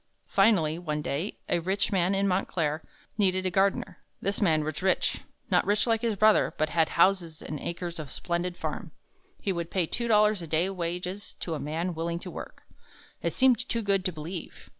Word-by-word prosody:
Finally, 165 Hz, -7 st, +3 dB
one 150 Hz, -3 st, -3 dB
day, 155 Hz, +10 st, -2 dB
a -, -, +2 dB
rich 190 Hz, +4 st, 0 dB
man 190 Hz, 0 st, +2 dB
in 200 Hz, +1 st, +2 dB
Montclair 165 Hz, -5 st, 0 dB, 0.4 s
needed 185 Hz, -2 st, +3 dB
a 185 Hz, -, +1 dB
gardener. 195 Hz, +2 st, +1 dB, 0.2 s
This 200 Hz, +3 st, -2 dB
man 160 Hz, -6 st, +3 dB
was 155 Hz, 0 st, -4 dB
rich 190 Hz, 0 st, +1 dB, 0.3 s
not -, -, +4 dB
rich 205 Hz, +1 st, +2 dB
like 225 Hz, -2 st, +1 dB
his 230 Hz, -3 st, 0 dB
brother 215 Hz, +2 st, +4 dB
but 155 Hz, 0 st, +1 dB
had 165 Hz, -1 st, +2 dB
houses 170 Hz, -3 st, +3 dB
and 150 Hz, -, -6 dB
acres 170 Hz, +1 st, -4 dB
of 150 Hz, -3 st, -6 dB
splendid 175 Hz, +3 st, -2 dB
farm. -, -, -5 dB, 0.5 s
He 195 Hz, -, -1 dB
would 170 Hz, -1 st, -3 dB
pay 185 Hz, -3 st, +1 dB
two 235 Hz, +8 st, -2 dB
dollars 210 Hz, -3 st, +4 dB
a 165 Hz, -, -6 dB
day 165 Hz, +5 st, +2 dB
wages 180 Hz, +2 st, -4 dB
to 170 Hz, -, -3 dB
a 155 Hz, -, -3 dB
man 165 Hz, +5 st, -2 dB
willing 170 Hz, +1 st, -2 dB
to -, -, -7 dB
work. -, -, -9 dB, 0.6 s
It -, -, 0 dB
seemed 255 Hz, -2 st, +3 dB
too 230 Hz, -1 st, -1 dB
good 200 Hz, -2 st, +2 dB
to 185 Hz, -, +2 dB
believe. 165 Hz, +2 st, -7 dB
180 Hz, 195 wpm, -28 LUFS, 165-200 Hz, 0.6 s, not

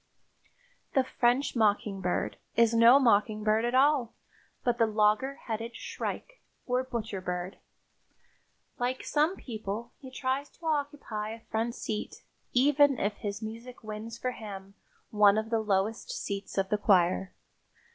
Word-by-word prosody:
The 265 Hz, -, +5 dB
"French 255 Hz, +2 st, +1 dB
mockingbird" 205 Hz, -4 st, 0 dB, 0.2 s
is 230 Hz, -1 st, +4 dB
no 230 Hz, +3 st, +8 dB
mockingbird 215 Hz, -2 st, +3 dB
at 240 Hz, +1 st, 0 dB
all, 270 Hz, -3 st, +3 dB, 0.5 s
but 245 Hz, -1 st, 0 dB
the 230 Hz, -, +4 dB
logger 215 Hz, +5 st, +2 dB
headed 230 Hz, +1 st, -4 dB
shrike, -, -, -6 dB, 0.2 s
or 250 Hz, 0 st, +1 dB
butcher 225 Hz, -6 st, -4 dB
bird. 180 Hz, +1 st, -4 dB, 1.2 s
Like 250 Hz, +1 st, -1 dB
some 310 Hz, +5 st, +1 dB
people, 220 Hz, -, -6 dB
he 265 Hz, -, -10 dB
tries 260 Hz, +2 st, -2 dB
to 335 Hz, -, -13 dB
occupy 285 Hz, -8 st, -2 dB
a 225 Hz, 0 st, -12 dB
front 230 Hz, +2 st, -1 dB
seat, 215 Hz, -1 st, -5 dB, 0.3 s
even 285 Hz, +1 st, +4 dB
if 205 Hz, -1 st, -1 dB
his 205 Hz, +1 st, -5 dB
music 230 Hz, +3 st, -8 dB
wins 215 Hz, +2 st, -6 dB
for 255 Hz, +1 st, -2 dB
him 195 Hz, -4 st, -9 dB, 0.4 s
one 210 Hz, -1 st, +5 dB
of 220 Hz, +1 st, -2 dB
the 225 Hz, -, +2 dB
lowest 215 Hz, -, 0 dB
seats 200 Hz, -, -5 dB
of 190 Hz, 0 st, +1 dB
the 210 Hz, -, +1 dB
choir. 185 Hz, -2 st, +2 dB
225 Hz, 135 wpm, -29 LUFS, 210-255 Hz, 1.2 s, no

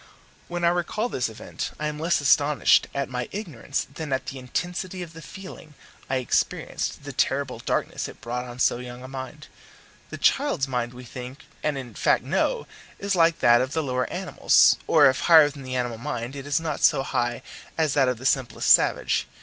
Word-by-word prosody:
When 175 Hz, 0 st, -4 dB
I 170 Hz, -, +5 dB
recall 180 Hz, +7 st, -1 dB
this 125 Hz, -, -1 dB
event 110 Hz, -, -6 dB
I 150 Hz, -, -2 dB
am 150 Hz, 0 st, -3 dB
less 165 Hz, 0 st, +1 dB
astonished 145 Hz, 0 st, +4 dB
at 140 Hz, -1 st, -2 dB
my 125 Hz, -1 st, -4 dB
ignorance 160 Hz, -, -4 dB
than 155 Hz, -1 st, -6 dB
at 130 Hz, -1 st, -1 dB
the 130 Hz, +1 st, -6 dB
intensity 180 Hz, +7 st, -4 dB
of 165 Hz, -1 st, -11 dB
the 165 Hz, -, -10 dB
feeling 175 Hz, -5 st, -11 dB, 0.3 s
I 135 Hz, -, 0 dB
experienced, 130 Hz, -2 st, -1 dB
the -, -, -7 dB
terrible -, -, 0 dB
darkness -, -, -2 dB
it -, -, -12 dB
brought 125 Hz, +1 st, -4 dB
on 120 Hz, 0 st, -9 dB
so 125 Hz, -, +2 dB
young 125 Hz, 0 st, -9 dB
a -, -, -8 dB
mind. 135 Hz, +3 st, -8 dB, 0.6 s
The -, -, -7 dB
child's 270 Hz, -, +2 dB
mind 125 Hz, -2 st, -3 dB
we 125 Hz, -, -10 dB
think, 125 Hz, +3 st, -9 dB, 0.2 s
and 150 Hz, -2 st, -1 dB
in 125 Hz, -4 st, -7 dB
fact -, -, +2 dB
know, -, -, 0 dB, 0.3 s
is 200 Hz, 0 st, -1 dB
like 165 Hz, -1 st, +3 dB
that 120 Hz, 0 st, +6 dB
of 130 Hz, +3 st, -2 dB
the 160 Hz, -, 0 dB
lower 125 Hz, -2 st, -1 dB
animals; -, -, +4 dB
or 155 Hz, -3 st, +6 dB
if 130 Hz, -1 st, +4 dB
higher 160 Hz, -4 st, +7 dB
than 140 Hz, -1 st, -11 dB
the 130 Hz, -1 st, -5 dB
animal 120 Hz, -3 st, -2 dB
mind, 125 Hz, -1 st, -4 dB
it 140 Hz, 0 st, -7 dB
is 145 Hz, -, +1 dB
not 160 Hz, -3 st, -4 dB
so 135 Hz, -, +4 dB
high 120 Hz, -2 st, -2 dB, 0.3 s
as 155 Hz, -3 st, +1 dB
that 135 Hz, -3 st, +3 dB
of 125 Hz, -, -2 dB
the 130 Hz, -, -10 dB
simplest 130 Hz, -3 st, +1 dB
savage. -, -, +3 dB
135 Hz, 200 wpm, -25 LUFS, 125-160 Hz, 0.6 s, higher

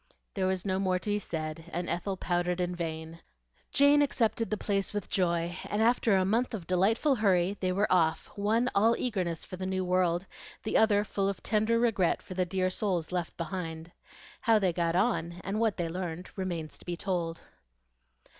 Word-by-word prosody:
There 190 Hz, -2 st, 0 dB
was 185 Hz, -1 st, -1 dB
no 190 Hz, -1 st, 0 dB
more 185 Hz, -1 st, +1 dB
to 205 Hz, +3 st, -3 dB
be 205 Hz, -, +1 dB
said, 160 Hz, -3 st, -5 dB
and 175 Hz, +1 st, -3 dB
Ethel 185 Hz, +3 st, -2 dB
pouted 175 Hz, 0 st, 0 dB
in 180 Hz, 0 st, -1 dB
vain. 160 Hz, -1 st, -5 dB, 0.5 s
Jane 285 Hz, +1 st, +5 dB
accepted 230 Hz, -5 st, +1 dB
the 215 Hz, -, -1 dB
place 195 Hz, -1 st, -1 dB
with 205 Hz, -, -4 dB
joy; 170 Hz, -2 st, 0 dB
and 205 Hz, -, -1 dB
after 225 Hz, -2 st, +3 dB
a 190 Hz, -1 st, +3 dB
month 230 Hz, +4 st, +1 dB
of 185 Hz, -6 st, -7 dB
delightful 200 Hz, -, +2 dB
hurry 195 Hz, -5 st, +2 dB
they 185 Hz, -1 st, 0 dB
were 200 Hz, +3 st, +2 dB
off, 165 Hz, -3 st, +3 dB
one 220 Hz, +4 st, +1 dB
all 225 Hz, +3 st, +4 dB
eagerness 185 Hz, -9 st, -2 dB
for 185 Hz, -, -8 dB
the 185 Hz, -, -4 dB
new 185 Hz, -1 st, -1 dB
world, 180 Hz, 0 st, +1 dB, 0.4 s
the 220 Hz, -, -2 dB
other 210 Hz, -2 st, +4 dB
full 195 Hz, -1 st, -1 dB
of 200 Hz, -, -5 dB
tender 220 Hz, +1 st, +2 dB
regret 225 Hz, -7 st, +2 dB
for -, -, -8 dB
the 185 Hz, 0 st, 0 dB
dear 185 Hz, +1 st, 0 dB
souls 180 Hz, -5 st, -1 dB
left 175 Hz, -2 st, -3 dB
behind. 165 Hz, -1 st, -5 dB, 0.5 s
How 225 Hz, -2 st, +4 dB
they 190 Hz, -4 st, +1 dB
got 170 Hz, -1 st, 0 dB
on, 185 Hz, -4 st, +1 dB
and 200 Hz, +3 st, -2 dB
what 225 Hz, -3 st, +1 dB
they 170 Hz, -2 st, -1 dB
learned, 175 Hz, 0 st, -5 dB
remains 175 Hz, -5 st, -4 dB
to -, -, -15 dB
be 175 Hz, -1 st, -3 dB
told. 170 Hz, -4 st, -2 dB
185 Hz, 190 wpm, -30 LUFS, 175-210 Hz, 0.5 s, Jane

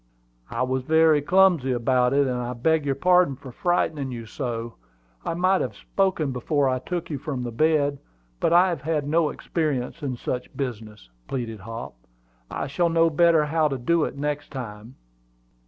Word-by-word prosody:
"I 115 Hz, +2 st, -1 dB
was 130 Hz, +1 st, -1 dB
very 160 Hz, +1 st, +4 dB
clumsy 175 Hz, -4 st, +4 dB
about 125 Hz, +1 st, +2 dB
it; 140 Hz, 0 st, +3 dB
and 125 Hz, -2 st, -1 dB
I 125 Hz, 0 st, -3 dB
beg 150 Hz, +5 st, +1 dB
your 135 Hz, -, +1 dB
pardon 180 Hz, -1 st, +3 dB
for 130 Hz, -1 st, -11 dB
frightening 155 Hz, -3 st, 0 dB
you 115 Hz, -2 st, -6 dB
so. 115 Hz, -1 st, -4 dB, 0.5 s
I -, -, -2 dB
might 185 Hz, +2 st, +2 dB
have 120 Hz, -5 st, -3 dB
spoken 185 Hz, -, 0 dB
before 140 Hz, +3 st, 0 dB
I 130 Hz, -1 st, 0 dB
took 175 Hz, +4 st, -4 dB
you 145 Hz, -, -3 dB
from 130 Hz, -3 st, -4 dB
the 120 Hz, -, -4 dB
bed. 145 Hz, +1 st, +2 dB, 0.4 s
But -, -, +1 dB
I 175 Hz, +2 st, +6 dB
have 170 Hz, -6 st, -3 dB
had 150 Hz, -1 st, -1 dB
no 160 Hz, 0 st, +2 dB
experience 150 Hz, -2 st, -3 dB
in 130 Hz, -4 st, -3 dB
such 125 Hz, +1 st, -5 dB
business," 110 Hz, -, -5 dB, 0.2 s
pleaded 115 Hz, -5 st, -4 dB
Hop. 115 Hz, +4 st, -7 dB, 0.6 s
"I -, -, -3 dB
shall 160 Hz, +5 st, 0 dB
know 165 Hz, 0 st, +3 dB
better 165 Hz, -1 st, +4 dB
how 155 Hz, +1 st, +2 dB
to 135 Hz, -2 st, -2 dB
do 165 Hz, +6 st, +1 dB
it -, -, -6 dB
next 145 Hz, 0 st, -3 dB
time." 115 Hz, -2 st, -8 dB
140 Hz, 180 wpm, -24 LUFS, 125-160 Hz, 0.6 s, I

